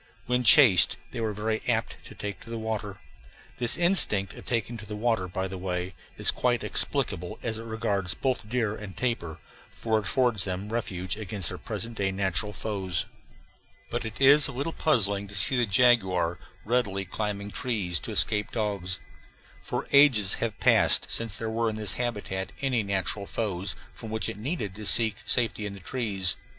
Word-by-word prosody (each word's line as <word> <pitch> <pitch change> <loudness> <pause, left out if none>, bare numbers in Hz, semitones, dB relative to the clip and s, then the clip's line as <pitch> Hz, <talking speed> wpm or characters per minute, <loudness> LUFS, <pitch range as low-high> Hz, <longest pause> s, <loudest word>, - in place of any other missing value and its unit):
When 125 0 0
chased 120 - +7
they - - -5
were 110 -1 -1
very 110 +1 -2
apt - - 0
to - - -12
take 105 -1 -6
to - - -14
the 115 - -4
water. 110 -3 -4 0.6
This 120 -1 +3
instinct 165 - +4
of - - -13
taking 120 0 -1
to 110 - -10
the 105 - -6
water, 110 -4 0
by 95 +2 -3
the 95 0 -7
way, 90 0 -3 0.2
is - - +2
quite 120 -2 0
explicable 90 +2 -1
as 110 -1 -3
regards 110 -4 -1
both 125 -5 -2
deer 110 -3 0
and 105 -4 -9
tapir, 115 -11 -2 0.3
for 110 -1 -1
it 105 - -7
affords 120 -2 +1
them 95 +3 -4
refuge 95 -4 -2
against 100 -5 +1
their - - -7
present 115 0 -5
day 95 -1 0
natural 95 0 -1
foes, 95 -5 -3 0.9
but 120 - -2
it 110 -1 -7
is 140 +2 +7
a - - -5
little 140 +5 -3
puzzling 100 -9 +1
to 100 - -8
see 95 +7 +3
the 120 -2 +2
jaguar 95 -6 +3 0.3
readily 105 -5 0
climbing 100 +2 -4
trees 95 -5 -1
to - - -6
escape 105 -1 +1
dogs; 100 -5 -2 0.6
for - - -4
ages 130 -9 +5
have 110 -3 -2
passed - - +3
since 115 -3 0
there 115 - -4
were 115 +1 0
in 110 - -5
its 105 -1 0
habitat 105 -5 -3
any 130 -4 +1
natural 100 0 -1
foes 95 -4 -2 0.2
from 110 - -9
which 110 0 0
it - - -5
needed 115 - -3
to 105 +2 -9
seek 110 -3 +3
safety 115 -3 +1
in 100 0 -7
trees. 95 -4 0
105 Hz, 180 wpm, -27 LUFS, 95-115 Hz, 0.9 s, chased